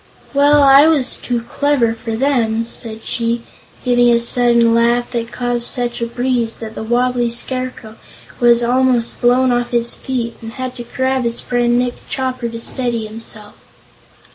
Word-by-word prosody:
"Well, 285 +1 +4
I 275 +2 +7
was 300 -6 +2
too 240 -2 -3
clever 250 -1 0
for 225 0 -5
them," 230 -3 0
said 225 -1 -8
she, 235 0 -2 0.4
giving 245 -1 +4
a 235 - +4
sudden 235 -1 +3
laugh 235 +1 +1
that 230 -1 -3
caused 245 -1 -1
such 240 -1 -1
a 235 - -1
breeze 245 -1 -1
that 220 -1 -7
the - - -7
wobbly 240 +1 0
Scarecrow 240 -2 -4 0.4
was 240 -1 +4
almost 250 -1 +1
blown 250 +1 +3
off 240 0 0
his 235 -1 +1
feet 240 -3 -4
and 225 0 -8
had 255 -1 -5
to 240 - -7
grab 260 0 0
his 235 0 -2
friend 240 -1 0
Nick 245 0 0 0.2
Chopper 255 -2 -3
to 230 0 -7
steady 235 -1 -2
himself. 215 -1 -10
240 Hz, 165 wpm, -17 LUFS, 230-255 Hz, 0.4 s, I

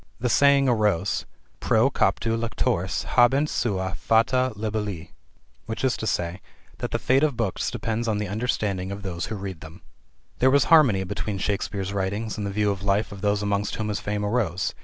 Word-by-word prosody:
The 125 - 0
saying 140 +2 +4
arose: 105 -6 +1 0.3
"pro - - +3
captu 115 0 +1
lectoris 115 -4 -1
habent 135 +5 +3
sua 95 -5 -1
fata 125 +3 +2
libelli" 105 -5 -4 0.6
i.e., 110 -7 -1 0.4
that - - -3
the - - -1
fate 130 +1 +2
of 145 -6 +1
books 110 -6 -1
depends 115 +1 -3
on 110 -2 +1
the 105 0 -2
understanding 100 -3 -2
of 100 0 -6
those 90 -2 -4
who 110 - -4
read 95 -4 -6
them. 80 +3 -12 0.6
There 130 - +5
was 140 0 +4
harmony 125 -12 +6
between 100 +1 -4
Shakespeare's 100 0 -2
writings 100 +3 -2
and 105 -1 -3
the - - -2
view 105 0 +1
of 100 -2 -4
life 100 +2 0
of 100 -1 -9
those 105 0 +1
amongst 100 0 -1
whom 110 -1 -3
his 105 0 -2
fame 105 0 -2
arose. 105 -5 -1
105 Hz, 175 wpm, -25 LUFS, 95-115 Hz, 0.6 s, harmony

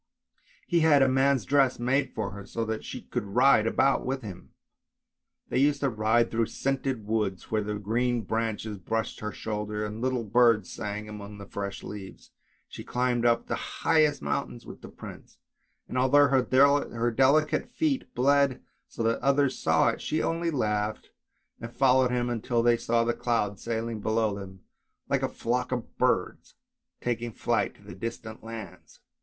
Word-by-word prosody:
He 175 -2 +2
had 150 -4 +5
a - - +4
man's 135 -2 +2
dress 135 -3 +3
made 130 +2 0
for 105 -3 -2
her, 100 0 -8
so 115 +3 -4
that 110 0 -3
she - - -7
could 120 - -3
ride 125 -3 +5
about 135 +4 +2
with 130 0 -3
him. 95 -4 -9 1.0
They - - +1
used 140 +1 +2
to 140 - +2
ride 110 +2 +2
through 115 -1 +1
scented 135 -4 -2
woods, 105 -4 -2
where 110 -1 +1
the 105 0 -3
green 120 +4 0
branches 110 -1 -3
brushed 110 +5 -3
her 105 0 -4
shoulders, 105 0 -4
and 105 +2 -7
little 130 -2 0
birds 115 -2 +3
sang 105 +1 -5
among 105 -1 -9
the 100 - -9
fresh 100 0 -5
leaves. 100 -2 -9 0.4
She - - -9
climbed 125 -1 0
up 115 0 +2
the - - -5
highest 155 - +3
mountains 65 -3 -3
with - - -11
the - - -10
prince, - - -12 0.5
and 125 - -2
although 140 +2 +5
her 130 -2 +3
delicate 140 - +2
feet 275 +1 -1
bled 140 +1 +2 0.2
so 115 - -5
that 115 0 +1
others 140 0 +2
saw - - +3
it, - - -4
she 155 - -1
only 165 +1 0
laughed 105 -7 -2 0.5
and 115 - -7
followed 130 0 +3
him 125 0 0
until 120 0 0
they 120 0 +5
saw 115 0 +1
the 120 0 0
clouds 105 -5 -1
sailing 115 -1 -3
below 110 0 0
them 95 -2 -9 0.5
like - - +1
a - - 0
flock 125 +2 -2
of 125 -2 -4
birds, - - 0 0.5
taking 120 -1 -2
flight - - -1
to - - -12
distant 110 +3 -7
lands. 110 -5 -10
115 Hz, 170 wpm, -27 LUFS, 105-130 Hz, 1.0 s, had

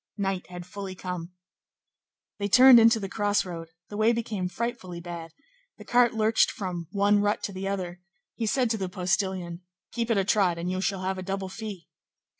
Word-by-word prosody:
Night 195 -2 -2
had 180 -1 -8
fully 190 +1 -7
come. 180 -2 -5 1.1
They 200 - 0
turned 250 +3 +9
into 230 0 +5
the 195 - -4
crossroad; 190 -5 -1 0.2
the 205 - -6
way 220 +2 +4
became 220 -5 -2
frightfully 185 -4 -4
bad; 170 -1 -7 0.5
the - - -12
cart 240 -1 +3
lurched 220 0 +3
from 180 -4 -5
one 205 +2 +3
rut 205 0 0
to - - -3
the 190 +1 -4
other; 180 -3 -4 0.3
he 225 - -3
said 245 0 +1
to 225 - 0
the 190 -1 -2
postilion:— 180 -1 -1 0.3
"Keep 235 -1 -2
at 230 - +2
a 195 - +3
trot, 190 -4 +2
and 175 +2 -3
you 185 0 -2
shall 195 -1 -1
have 190 0 -2
a - - -4
double 190 0 -3
fee." 200 -4 -7
195 Hz, 190 wpm, -27 LUFS, 180-215 Hz, 1.1 s, turned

